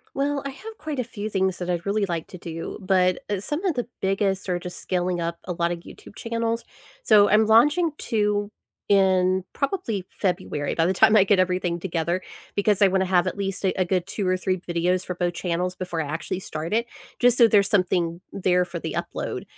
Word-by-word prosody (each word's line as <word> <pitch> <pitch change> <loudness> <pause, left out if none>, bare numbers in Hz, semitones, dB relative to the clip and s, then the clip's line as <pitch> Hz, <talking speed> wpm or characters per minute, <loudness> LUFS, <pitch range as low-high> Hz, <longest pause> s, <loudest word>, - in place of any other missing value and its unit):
Well, 280 +1 0
I - - -2
have 435 +11 -10
quite 305 -3 -4
a - - +1
few 215 -2 -6
things 190 -3 0
that 180 0 -5
I'd 175 -1 -1
really 200 +1 +1
like 170 -3 -3
to 185 - -9
do, 165 -1 -6
but, 185 -1 +2
uh, 205 -2 0
some 295 - -3
of 355 -6 +1
the 245 -2 -2
biggest 195 0 0
are 180 - +1
just 180 0 -7
scaling 180 -1 -1
up 170 0 -2
a 180 - -3
lot 170 0 0
of 170 -1 -4
YouTube 195 - -14
channels, 230 0 -2 0.4
so 205 - +6
I'm 215 +1 +5
launching 295 +10 +4
2 210 -2 0 0.4
in 190 -2 +3
probably 275 - -2
February 180 -6 -2
by 165 - +1
the 185 - +2
time 215 +3 +5
I 205 - +7
get 200 0 +3
everything 180 -2 0
together, 170 0 -2 0.3
because 205 0 +2
I 200 - +8
wanna 190 0 +1
have 180 -1 +2
at 185 - -3
least, 195 -1 -3
eh, 190 - +3
a 185 - +1
good 180 0 0
2 195 -1 -2
or 185 - +3
3 185 0 -1
videos 175 +1 0
for 180 - -3
both 175 -1 -2
channels 180 +1 -2
before 180 -3 -3
I 150 - -4
actually 165 +4 -3
start 160 -1 -5
it, 235 +2 +1 0.3
just 245 -1 +4
so 235 - +7
there's 205 -2 +4
something 180 -4 +1
there 180 -2 +2
for 170 -1 -6
the - - -5
upload. - - -4
190 Hz, 220 wpm, -24 LUFS, 180-210 Hz, 0.4 s, I